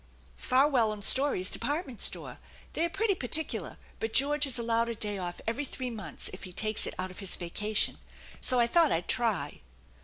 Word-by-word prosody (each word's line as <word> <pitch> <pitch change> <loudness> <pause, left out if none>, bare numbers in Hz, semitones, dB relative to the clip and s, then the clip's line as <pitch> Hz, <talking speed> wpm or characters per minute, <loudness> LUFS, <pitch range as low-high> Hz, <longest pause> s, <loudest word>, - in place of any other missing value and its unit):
" - - -27
" - - -28
Farwell 255 -4 +4
and 210 -1 -6
Story's 260 -9 +3
department 270 - -2
store. - - -1 0.3
They 330 - +1
are - - -2
pretty 395 +5 +1
particular, 315 -1 0 0.2
but 225 0 -3
George 290 +1 +3
is 260 -2 -1
allowed 230 0 0
a 235 - -3
day 210 -2 -2
off 175 -1 -5
every 230 +6 -1
three 255 -2 -5
months 220 -3 -3
if - - -9
he 185 - -8
takes 215 +3 +1
it - - -6
out 185 0 -4
of 185 - -12
his 195 -2 -1
vacation; 210 +5 0 0.4
so 255 - +4
I 235 - +5
thought 325 +6 +4
I'd 165 +1 -1
try." 220 - -1
235 Hz, 205 wpm, -29 LUFS, 210-280 Hz, 0.4 s, I